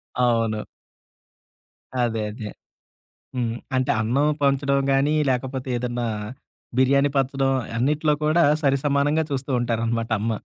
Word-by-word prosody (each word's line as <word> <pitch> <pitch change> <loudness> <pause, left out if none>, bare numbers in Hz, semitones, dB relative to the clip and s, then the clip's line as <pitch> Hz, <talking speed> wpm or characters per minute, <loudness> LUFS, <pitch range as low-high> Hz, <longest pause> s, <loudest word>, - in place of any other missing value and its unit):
అవును. 115 -3 +1 1.4
అదే 115 -2 0
అదే. 110 -1 -7 0.9
హ్మ్. 115 -2 -1 0.2
అంటే, 130 0 +1
అన్నం 125 +7 +1 0.2
పంచడం 140 0 +2
గానీ, 140 +3 +2 0.2
లేకపోతే 130 +1 -2
ఏదన్నా, 120 -1 -2 0.7
బిర్యానీ 140 +2 +4
పంచడం, 135 0 +1 0.2
అన్నిట్లో 150 +5 +2
కూడా 160 +3 +3 0.2
సరి 140 -1 +3
సమానంగా 145 +3 +2
చూస్తూంటారనమాట 120 -4 -1
అమ్మ. 115 +2 -1
130 Hz, 105 wpm, -23 LUFS, 120-140 Hz, 1.4 s, బిర్యానీ